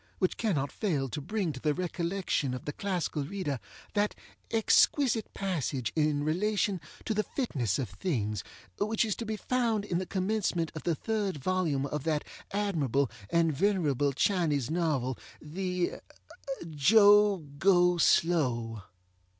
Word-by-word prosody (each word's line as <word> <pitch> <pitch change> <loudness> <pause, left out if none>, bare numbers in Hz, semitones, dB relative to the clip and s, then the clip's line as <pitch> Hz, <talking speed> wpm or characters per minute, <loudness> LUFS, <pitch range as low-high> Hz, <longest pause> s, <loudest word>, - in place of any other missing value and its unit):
which 185 - +1
cannot 155 -12 0
fail 155 -11 -1
to 150 +4 -5
bring 185 0 -2
to 130 - -8
the 150 +2 0
recollection 175 -6 -1
of 125 - -8
the 145 - -3
classical 180 -6 -2
reader 145 -5 -3 0.3
that 205 0 +1 0.3
exquisite 225 +1 +3
passage 150 -10 -2
in 150 -2 +1
relation 195 +3 0 0.2
to 220 - 0
the 215 - +2
fitness 135 - -1
of 130 - -2
things, 105 - -2 0.4
which 215 +2 +1
is 215 - -1
to 230 - -6
be 220 - -1
found 230 -2 0
in 175 -4 -1
the 185 - -4
commencement 190 -4 0
of 155 - -6
the 170 - 0
third 205 -2 -2
volume 155 -3 0
of 145 0 -3
that 155 -2 0 0.3
admirable 150 - 0 0.2
and 165 -2 +2
venerable 145 -5 +1
Chinese 150 - +1
novel 150 -7 0 0.2
the 180 +3 -2 0.8
Jo 205 +6 +6 0.2
Go 180 -1 +4
Slow. 125 -12 +2
175 Hz, 140 wpm, -30 LUFS, 145-200 Hz, 0.8 s, Jo